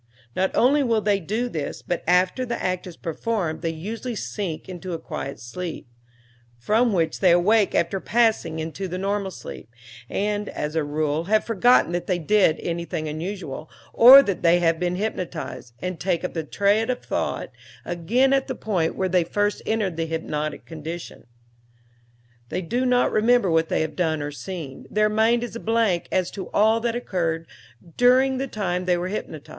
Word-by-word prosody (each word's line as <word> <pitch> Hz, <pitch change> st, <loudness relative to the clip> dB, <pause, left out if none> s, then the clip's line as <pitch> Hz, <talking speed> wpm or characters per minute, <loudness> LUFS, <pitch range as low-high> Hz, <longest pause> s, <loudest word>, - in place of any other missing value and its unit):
Not 190 Hz, 0 st, +2 dB
only 280 Hz, +4 st, +4 dB
will 230 Hz, -5 st, +1 dB
they 205 Hz, -1 st, +2 dB
do 215 Hz, +7 st, -2 dB
this, 155 Hz, -11 st, -5 dB
but 175 Hz, -, -3 dB
after 180 Hz, +7 st, +3 dB
the 240 Hz, -1 st, -3 dB
act 185 Hz, 0 st, -2 dB
is 175 Hz, -, -10 dB
performed 165 Hz, -2 st, -3 dB
they 165 Hz, -, -1 dB
usually 215 Hz, +9 st, -5 dB
sink 195 Hz, -6 st, -4 dB
into 185 Hz, -1 st, -6 dB
a -, -, -2 dB
quiet 140 Hz, -3 st, -6 dB
sleep, 160 Hz, +6 st, -6 dB, 0.7 s
from 220 Hz, -, +2 dB
which 170 Hz, -5 st, 0 dB
they 185 Hz, -, +4 dB
awake 195 Hz, +5 st, +4 dB
after 170 Hz, +3 st, +1 dB
passing 220 Hz, -8 st, +1 dB
into 160 Hz, +4 st, -4 dB
the 180 Hz, 0 st, -4 dB
normal 200 Hz, +1 st, -1 dB
sleep, 165 Hz, -, -10 dB, 0.4 s
and, 210 Hz, +1 st, -1 dB
as 150 Hz, +1 st, -4 dB
a 160 Hz, -, +1 dB
rule, 150 Hz, +2 st, -1 dB
have 215 Hz, +3 st, +2 dB
forgotten 230 Hz, -2 st, +3 dB
that 175 Hz, 0 st, -3 dB
they 185 Hz, -, +1 dB
did 175 Hz, -1 st, +3 dB
anything 170 Hz, -1 st, -3 dB
unusual, 160 Hz, -1 st, -5 dB, 0.2 s
or 265 Hz, +4 st, +10 dB
that 195 Hz, -6 st, -2 dB
they 170 Hz, 0 st, +5 dB
have 165 Hz, -1 st, +2 dB
been 180 Hz, 0 st, 0 dB
hypnotized, 180 Hz, -, -5 dB
and 180 Hz, -2 st, -3 dB
take 180 Hz, -2 st, -1 dB
up 180 Hz, -, -3 dB
the 160 Hz, -2 st, -3 dB
thread 205 Hz, -, +1 dB
of 255 Hz, -, -2 dB
thought -, -, -2 dB, 0.3 s
again 235 Hz, +11 st, +1 dB
at 270 Hz, -1 st, +1 dB
the -, -, -3 dB
point 180 Hz, -7 st, -1 dB
where 190 Hz, -, 0 dB
they 180 Hz, -1 st, +3 dB
first 205 Hz, +4 st, -1 dB
entered 210 Hz, -6 st, 0 dB
the 165 Hz, 0 st, -1 dB
hypnotic 155 Hz, -2 st, -3 dB
condition. 165 Hz, +1 st, -8 dB, 1.2 s
They 185 Hz, -, -3 dB
do 245 Hz, +9 st, -1 dB
not 250 Hz, 0 st, +3 dB
remember 225 Hz, -3 st, +3 dB
what 160 Hz, 0 st, +2 dB
they -, -, +1 dB
have 155 Hz, -1 st, -3 dB
done 160 Hz, -4 st, 0 dB
or 145 Hz, -, -4 dB
seen. 155 Hz, -3 st, -7 dB
Their 215 Hz, 0 st, +2 dB
mind 225 Hz, +3 st, +2 dB
is 240 Hz, -, -6 dB
a -, -, -4 dB
blank 225 Hz, -7 st, +1 dB
as 185 Hz, -1 st, 0 dB
to 190 Hz, -3 st, -7 dB
all 220 Hz, +2 st, +3 dB
that 230 Hz, 0 st, -1 dB
occurred 165 Hz, -8 st, -2 dB, 0.5 s
during 255 Hz, +2 st, +4 dB
the 270 Hz, -, -2 dB
time 185 Hz, -6 st, -2 dB
they 180 Hz, -1 st, +2 dB
were 175 Hz, +1 st, -2 dB
hypnotized. 165 Hz, -6 st, -6 dB
185 Hz, 185 wpm, -24 LUFS, 165-220 Hz, 1.2 s, or